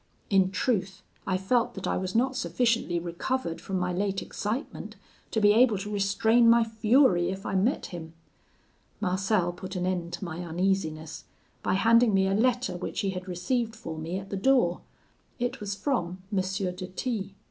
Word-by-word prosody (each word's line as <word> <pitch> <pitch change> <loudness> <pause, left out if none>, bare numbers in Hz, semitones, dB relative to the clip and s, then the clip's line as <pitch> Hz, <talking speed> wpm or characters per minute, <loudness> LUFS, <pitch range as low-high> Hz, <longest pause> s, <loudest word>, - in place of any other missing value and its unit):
In 190 -1 +4
truth, 190 -2 -1 0.2
I 185 - +1
felt 230 +6 +1
that 190 - -5
I - - 0
was 185 +1 -3
not 260 +3 +2
sufficiently 230 0 +1
recovered 170 +3 -3
from 195 - -3
my 180 0 -1
late 195 +1 -1
excitement 225 +7 -4 0.3
to 220 - 0
be 205 -1 +6
able 225 -1 +5
to 205 +2 -5
restrain 220 +4 +3
my 235 0 +6
fury 220 -4 +3
if 190 +1 -5
I - - -3
met 200 +8 +1
him. 165 -2 -8 0.9
Marcel 185 -2 +1
put 185 +2 -8
an 180 0 -1
end 175 -2 -2
to 175 +2 -4
my 170 -1 -6
uneasiness, 170 -3 -2 0.4
by 185 - +1
handing 230 +1 +5
me 190 0 +3
a 195 - +1
letter 245 +1 +1
which 180 - -3
he 195 - 0
had 185 0 -6
received 225 +6 -1
for 165 -8 -7
me 160 +3 -4
at 195 0 -8
the 200 - -2
door; 195 -6 +3 0.6
it 245 +1 -2
was 205 -1 -3
from 190 -5 -2
M. - - +3
de 185 -1 -3
T 200 0 -4
195 Hz, 180 wpm, -28 LUFS, 180-225 Hz, 0.9 s, be